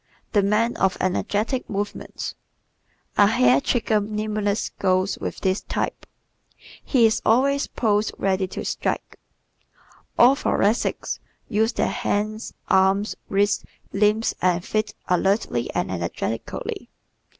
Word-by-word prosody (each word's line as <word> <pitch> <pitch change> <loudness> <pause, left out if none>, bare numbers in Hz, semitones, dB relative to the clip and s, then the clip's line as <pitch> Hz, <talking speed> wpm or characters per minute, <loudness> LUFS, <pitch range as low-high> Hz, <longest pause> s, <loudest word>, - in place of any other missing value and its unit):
The 205 - +4
Man 210 +4 +1
of 190 -1 +1
Energetic 210 +7 -1
Movements 205 0 -4 0.8
¶ - - +7
A - - +6
hair 130 - +4
trigger 220 - +1
nimbleness 210 0 -1
goes 185 +1 +1
with - - -5
this 190 0 +1
type. - - -3 0.8
He 250 -5 +4
is 220 - +2
always 275 +5 +3
"poised 210 -2 +1
ready 190 -1 0
to - - -6
strike." - - -3 1.0
All 250 +3 +7
Thoracics 220 -5 0 0.3
use 220 +3 +1
their - - +1
hands, 215 -2 -2 0.2
arms, 190 +2 +3
wrists, 200 +1 +2 0.3
limbs 210 +3 +2
and 180 -1 +1
feet 215 0 -1
alertly 180 - +1
and - - -1
energetically. 95 +5 -4
205 Hz, 115 wpm, -23 LUFS, 190-220 Hz, 1.0 s, ¶